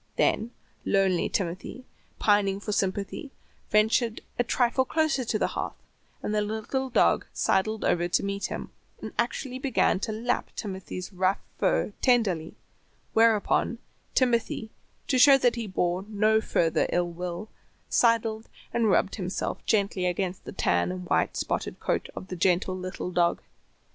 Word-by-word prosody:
Then 225 Hz, -, +2 dB, 0.3 s
lonely 195 Hz, -3 st, +2 dB
Timothy, 195 Hz, +7 st, -3 dB, 0.3 s
pining 200 Hz, -2 st, +2 dB
for 210 Hz, -, -4 dB
sympathy, 200 Hz, +7 st, -2 dB, 0.4 s
ventured 220 Hz, +2 st, +2 dB, 0.2 s
a -, -, +4 dB
trifle 245 Hz, +2 st, +2 dB
closer 310 Hz, -1 st, +1 dB
to 225 Hz, -2 st, -1 dB
the -, -, 0 dB
hearth, -, -, -4 dB, 0.5 s
and 210 Hz, -, -2 dB
the 210 Hz, -, +2 dB
little 220 Hz, +5 st, -2 dB
dog 250 Hz, -, +3 dB
sidled 215 Hz, +3 st, +1 dB
over 175 Hz, 0 st, +2 dB
to 175 Hz, -, +1 dB
meet 200 Hz, 0 st, -2 dB
him, -, -, -6 dB, 0.3 s
and -, -, -7 dB
actually 260 Hz, -2 st, -1 dB
began 260 Hz, -7 st, +2 dB
to 220 Hz, -, -3 dB
lap 235 Hz, +3 st, -1 dB
Timothy's 190 Hz, -2 st, -6 dB
rough 185 Hz, +1 st, +2 dB, 0.2 s
fur 210 Hz, -, +1 dB
tenderly, 200 Hz, -11 st, +2 dB, 0.6 s
whereupon 225 Hz, +1 st, +3 dB, 0.4 s
Timothy, 235 Hz, -3 st, +1 dB, 0.3 s
to 260 Hz, -, +1 dB
show 275 Hz, +1 st, +8 dB
that 245 Hz, -2 st, +2 dB
he 230 Hz, -2 st, -4 dB
bore 180 Hz, -1 st, 0 dB
no 215 Hz, +1 st, +2 dB
further 165 Hz, -6 st, +1 dB
ill 175 Hz, 0 st, +1 dB
will, 180 Hz, +4 st, -5 dB, 0.4 s
sidled 225 Hz, -2 st, +2 dB, 0.2 s
and 230 Hz, -2 st, +2 dB
rubbed 195 Hz, +1 st, +2 dB
himself 185 Hz, -2 st, -3 dB
gently 200 Hz, -4 st, +1 dB
against 180 Hz, +1 st, -2 dB
the -, -, -6 dB
tan 85 Hz, 0 st, +1 dB
and 90 Hz, 0 st, -6 dB
white -, -, +2 dB
spotted -, -, -2 dB
coat -, -, -1 dB
of 190 Hz, -, -8 dB
the 185 Hz, -, -4 dB
gentle 180 Hz, +1 st, +1 dB
little 185 Hz, 0 st, -5 dB
dog. 175 Hz, -1 st, +1 dB
205 Hz, 150 wpm, -27 LUFS, 185-230 Hz, 0.6 s, show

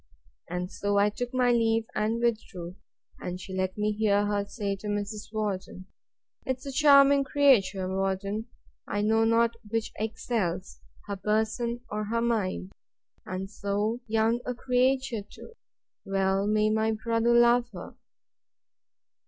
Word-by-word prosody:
And 180 Hz, +2 st, -3 dB
so 205 Hz, 0 st, -1 dB
I 205 Hz, +1 st, +4 dB
took 245 Hz, +3 st, -4 dB
my 250 Hz, -1 st, +3 dB
leave, 225 Hz, -1 st, +2 dB
and 225 Hz, +2 st, -1 dB
withdrew; 190 Hz, -7 st, -2 dB, 0.4 s
and 180 Hz, 0 st, -5 dB
she 190 Hz, +1 st, -8 dB
let 185 Hz, +1 st, -2 dB
me 210 Hz, 0 st, +1 dB
hear 205 Hz, -1 st, +2 dB
her 205 Hz, -1 st, 0 dB
say 200 Hz, -1 st, -3 dB
to 210 Hz, -, -8 dB
Mrs. 205 Hz, +1 st, -4 dB
Worden, 195 Hz, -3 st, -4 dB, 0.6 s
'Tis 260 Hz, +1 st, -3 dB
a 275 Hz, -, -4 dB
charming 280 Hz, 0 st, +6 dB
creature, 250 Hz, -10 st, +3 dB
Worden!—I 195 Hz, +3 st, -4 dB
know 225 Hz, +1 st, +3 dB
not 230 Hz, +1 st, +3 dB, 0.2 s
which 225 Hz, 0 st, -2 dB
excels; 215 Hz, -4 st, -2 dB, 0.3 s
her 200 Hz, -1 st, -4 dB
person, 220 Hz, +4 st, -1 dB
or 210 Hz, 0 st, -2 dB
her 230 Hz, +3 st, -1 dB
mind!—And 195 Hz, -3 st, -4 dB
so 205 Hz, +3 st, -2 dB
young 225 Hz, +2 st, +2 dB
a 250 Hz, -, -3 dB
creature 255 Hz, -1 st, +1 dB
too!—Well 195 Hz, -, -4 dB
may 215 Hz, 0 st, +2 dB
my 220 Hz, 0 st, +1 dB
brother 230 Hz, +2 st, +1 dB
love 240 Hz, 0 st, +5 dB
her! 180 Hz, -4 st, -9 dB
215 Hz, 130 wpm, -28 LUFS, 200-235 Hz, 0.6 s, charming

